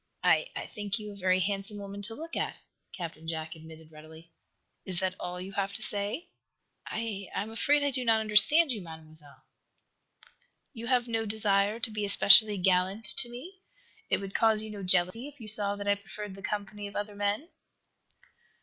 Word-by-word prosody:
"I - - +3
I - - -5
think 205 -2 -4
you 210 -1 -8
a - - -11
very 185 -1 +1
handsome 200 +2 -2
woman 200 0 -8
to 225 +3 -5
look 330 +4 -8
at," - - -3 0.3
Captain 165 -3 -8
Jack 160 -1 -5
admitted, 160 0 -14
readily. 160 +2 -14 0.5
"Is 185 -3 +1
that 185 -1 -1
all 180 0 -5
you 185 +2 -7
have 200 0 -3
to 220 - -3
say?" 210 - -2 0.6
"I 215 -3 -5
I - - -1
am 220 - -9
afraid 285 +6 +1
I 285 - +1
do 255 -1 -3
not 225 -2 +3
understand 260 +9 +6
you, 220 -4 -3
Mademoiselle." 155 -3 -13 1.3
"You 230 -2 -8
have 250 -1 +1
no 225 -1 -2
desire 205 0 +1
to 225 - -3
be 215 -1 -4
especially 205 +1 +6
gallant 185 +3 +1
to 240 - +3
me? 345 +11 -11 0.5
It - - +2
would 195 -1 -8
cause 220 -1 +4
you 220 - -8
no 205 -1 -8
jealousy 185 +6 +1
if 290 -1 -14
you, 225 - -10
saw 205 -1 +5
that 205 0 -7
I 200 - +4
preferred 200 0 -8
the 195 - -12
company 205 +1 -5
of 200 - -13
other 205 0 -4
men?" 205 - -2
205 Hz, 190 wpm, -29 LUFS, 185-225 Hz, 1.3 s, understand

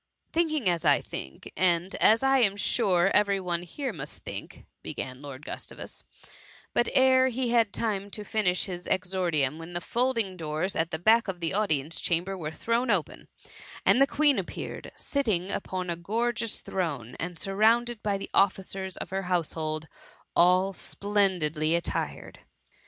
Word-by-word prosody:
^ - - -43
Thinking 310 - +1
as 170 -2 +2
I 145 -3 +5
think, 65 0 -8
and 180 +1 +1
as 225 +4 +5
I 270 0 +4
am 200 -5 +4
sure 190 -2 +2
every 200 -1 +3
one 175 -2 -2
here 250 - -5
must 150 -2 -8
think,'' - - -7 0.2
began 130 +1 -5
Lord 140 0 -9
Gtis - - -6
tavus, - - -10 0.4
— - - -23
but, 240 - +2
ere 260 0 +5
he 255 -1 -1
had 230 -4 +3
time 205 -3 -2
to 210 +1 -6
finish 205 -4 0
his 180 -2 -6
exordium, 175 -6 0 0.2
the - - 0
folding 230 -2 0
doors 160 +3 -2
at 160 0 0
the 160 - -3
back 220 +7 +4
of 185 -2 -4
the 165 -2 0
audience 165 -7 0
chamber 175 +3 0
were 160 -5 -4
thrown 230 +9 -1
open, 190 -8 -1 0.6
and 255 - +5
the 275 - +6
Queen 290 0 +3
appeared, - - -6
sitting 210 -10 -1
upon 185 -1 -3
a - - -1
gorgeous 230 +5 -1
throne, 145 -11 -3
and 175 +1 -4
surrounded 225 +5 +2
by 205 -2 0
the 195 - -8
ofiicers 190 -1 +1
of - - -6
her 195 0 -1
household 160 -3 -1 0.5
all 185 +2 +4
splendidly 180 -7 0
attired. 170 - -3
190 Hz, 165 wpm, -27 LUFS, 170-225 Hz, 0.6 s, the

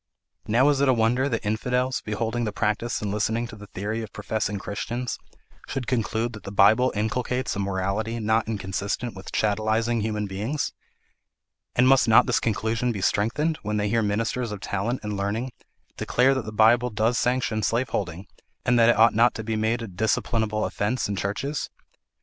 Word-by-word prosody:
"Now 120 +6 +4
is 140 -2 +2
it 140 - +4
a 130 - +4
wonder 120 +4 +2
that 115 -4 -2
infidels, 125 +4 0
beholding 110 +2 -2
the 110 - -1
practice 105 +3 -1
and 105 - -2
listening 110 +3 0
to - - -9
the 105 0 -11
theory 105 +5 -4
of 110 -2 -7
professing 105 -1 -2
Christians, 120 +5 -4 0.5
should 135 -2 -3
conclude 115 -1 -1
that 110 - -9
the 100 - -8
Bible 110 +6 +5
inculcates 125 +3 -1
a - - -3
morality 100 +4 -1
not 110 +1 +1
inconsistent 100 +3 -3
with 95 0 -9
chattelising 110 +2 +1
human 105 -1 -2
beings? 105 +10 -3 1.0
And 125 +1 +4
must 135 -1 +5
not 110 - +6
this - - +2
conclusion 115 +2 0
be 100 -4 -4
strengthened, 135 - +1
when 105 +1 -2
they 105 0 0
hear 115 +2 +2
ministers 110 +3 -1
of 105 - -5
talent 105 +6 -2
and 105 -1 -3
learning 105 +6 -2 0.5
declare 130 +2 +3
that 130 -3 -2
the 110 - -5
Bible 115 +3 +4
does 110 +2 +1
sanction 125 -3 0
slaveholding, 100 -7 -1 0.4
and 120 0 +3
that 115 0 +6
it 120 - +4
ought 115 +1 +6
not 120 +3 +4
to 110 - -5
be 110 0 -2
made 110 +2 0
a - - -5
disciplinable 110 +2 0
offence 110 +5 -1
in 100 - -2
churches? 105 +10 -3
110 Hz, 180 wpm, -25 LUFS, 105-120 Hz, 1.0 s, not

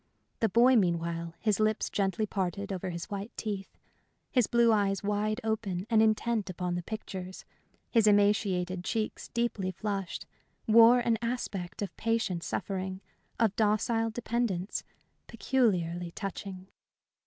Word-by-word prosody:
The 225 - +2
boy, 240 +6 +5
meanwhile, 170 -3 0
his 215 -3 0
lips 215 0 +1
gently 200 +2 0
parted 195 0 -2
over 185 0 -3
his 170 -1 -5
white 200 +2 -5
teeth, 200 -3 -5 0.5
his 250 -5 +3
blue 235 -1 +4
eyes 200 -2 +1
wide 210 +2 0
open 210 -5 -2
and 220 -1 +5
intent 220 -1 +1
upon 180 0 -3
the 175 - -2
pictures, 185 -2 -7 0.5
his 225 -3 +4
emaciated 200 -3 +2
cheeks 215 +2 -2
deeply 235 -6 -1
flushed, 195 -1 -4 0.4
wore 230 +2 +7
an 230 -2 +1
aspect 210 -7 -3
of 195 - -6
patient 225 -6 0
suffering, 190 0 -3 0.4
of 220 -3 +2
docile 225 +1 +2
dependence, 225 -5 -2 0.4
peculiarly 180 -9 0
touching. 190 +1 -6
205 Hz, 130 wpm, -30 LUFS, 185-225 Hz, 0.5 s, wore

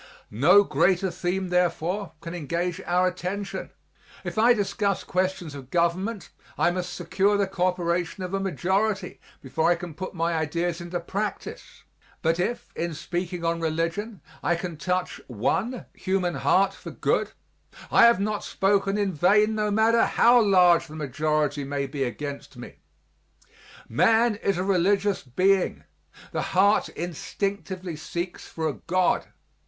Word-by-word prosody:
No 145 - +6
greater 180 +3 +2
theme, 185 +1 -2
therefore, 180 +1 0
can 170 - -7
engage 175 +3 -2
our 180 +1 +3
attention. 185 +2 -4 0.5
If - - -5
I 235 +3 +6
discuss 200 -1 -1
questions 185 -4 -2
of 135 -3 -10
government 180 +6 -1 0.3
I 175 - +3
must 180 0 -4
secure 190 +4 +1
the 200 - +2
coöperation 180 -1 -1
of 180 - -7
a 195 - +1
majority 195 +1 -1 0.2
before 160 +5 0
I 175 - +4
can 170 -1 -8
put 185 +4 -7
my 170 0 0
ideas 170 +2 -1
into 175 +1 -4
practise, 200 +4 -5 0.4
but 165 +1 +2
if, 235 +7 -2
in 170 -1 -3
speaking 175 +2 -4
on 165 0 0
religion, 165 +6 -2 0.2
I 175 - +1
can 175 -1 -5
touch 180 +3 -2
one 140 - -1
human 185 -2 -1
heart 190 +7 +2
for - - -10
good, - - 0 0.6
I - - +7
have 235 -3 +5
not 210 +1 -1
spoken 195 0 +1
in 200 -2 0
vain 205 +7 +4
no 215 -1 0
matter 220 +2 +4
how 240 +1 +5
large 180 -5 +5
the 155 - -10
majority 150 0 -1
may 140 0 -2
be 135 0 -3
against 140 +3 -6
me. - - -10 1.1
Man 225 +1 +3
is 195 -3 0
a 180 - 0
religious 195 +1 +2
being; 185 +9 +1 0.5
the - - -1
heart 200 +3 +3
instinctively 185 +1 -4
seeks 170 +3 -5
for 160 -1 -3
a 150 - -1
God. 185 +4 0
180 Hz, 145 wpm, -25 LUFS, 165-195 Hz, 1.1 s, I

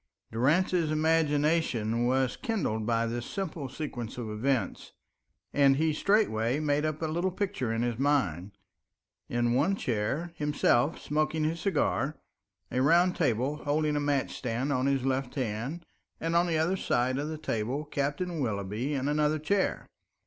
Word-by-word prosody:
Durrance's 160 +7 +2
imagination 150 -7 +1
was 130 0 +1
kindled 145 - -2
by 115 -1 +2
this 120 +1 -3
simple 165 -5 -4
sequence 125 -5 -5
of 115 -3 -4
events, 125 +4 -1 0.6
and 140 -1 +5
he 155 +2 +1
straightway 145 - +2
made 150 0 +1
up 155 +1 -2
a - - +2
little 170 +4 0
picture 180 - -2
in 115 +1 0
his 120 -1 -2
mind. 100 - +1 0.8
In 120 0 +1
one 155 +10 +2
chair 130 - -2
himself 150 -2 +1
smoking 155 +1 0
his 160 +2 -1
cigar, 155 -5 0 0.5
a 125 - +1
round 175 +6 +4
table 135 0 0
holding 150 0 0
a - - +1
match 145 -2 0
stand 125 +4 -2
on 130 0 +1
his 135 -2 +1
left 130 -1 -1
hand, 130 +6 -3 0.3
and 165 +1 -1
on 175 +1 +4
the 165 -2 +1
other 170 +5 +1
side 130 -4 0
of 145 - -2
the 155 0 -4
table 130 +1 -2
Captain 145 +5 -2
Willoughby 110 +3 -2
in 135 0 -1
another 150 +1 +2
chair. 190 +6 0
145 Hz, 155 wpm, -29 LUFS, 120-160 Hz, 0.8 s, and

